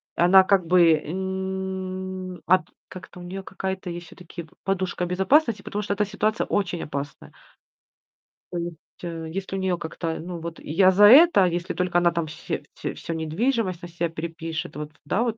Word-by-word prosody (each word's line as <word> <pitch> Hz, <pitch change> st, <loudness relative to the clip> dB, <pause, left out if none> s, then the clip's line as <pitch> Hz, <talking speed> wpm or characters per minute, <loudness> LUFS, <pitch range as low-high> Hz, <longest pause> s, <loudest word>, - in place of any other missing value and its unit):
Она, 185 Hz, +3 st, +7 dB
как 190 Hz, -2 st, +3 dB
бы, 175 Hz, -2 st, +6 dB
м, 190 Hz, +2 st, -4 dB
от 185 Hz, +1 st, +5 dB, 0.3 s
как 185 Hz, -, -9 dB
там 180 Hz, 0 st, -11 dB
у -, -, -8 dB
неё, 190 Hz, +2 st, -6 dB
какая-то 190 Hz, -1 st, -4 dB
есть 175 Hz, 0 st, -6 dB
все-таки, 175 Hz, 0 st, -10 dB
п 155 Hz, -, -21 dB
подушка 185 Hz, -2 st, -1 dB
безопасности, 200 Hz, -, +2 dB
потому 205 Hz, +1 st, -4 dB
что 200 Hz, -, -1 dB
эта 210 Hz, +1 st, +1 dB
ситуация 215 Hz, +2 st, 0 dB
очень 180 Hz, -4 st, -1 dB
опасная. 140 Hz, 0 st, -6 dB, 1.2 s
То 175 Hz, -, -3 dB
есть, 170 Hz, -1 st, -4 dB, 0.3 s
э, 165 Hz, -2 st, -5 dB
если 195 Hz, 0 st, -4 dB
у -, -, -2 dB
нее 185 Hz, -2 st, 0 dB
как-то 165 Hz, 0 st, -4 dB
Ну, 175 Hz, +1 st, -6 dB
вот 165 Hz, 0 st, -7 dB
я 185 Hz, +5 st, +4 dB
за 195 Hz, +3 st, +4 dB
это, 275 Hz, -, +8 dB
если 175 Hz, 0 st, -1 dB
только 180 Hz, -1 st, 0 dB
она 175 Hz, 0 st, +3 dB
там 170 Hz, -1 st, -1 dB
все 150 Hz, -, -5 dB
всё -, -, -4 dB
всё 165 Hz, -, -5 dB
недвижимость 185 Hz, -, -1 dB
на -, -, -5 dB
себя 170 Hz, 0 st, -2 dB
перепишет, 165 Hz, 0 st, -5 dB
вот, 150 Hz, 0 st, -6 dB
да, 190 Hz, +9 st, 0 dB
вот? 230 Hz, -2 st, -2 dB
180 Hz, 185 wpm, -24 LUFS, 170-190 Hz, 1.2 s, это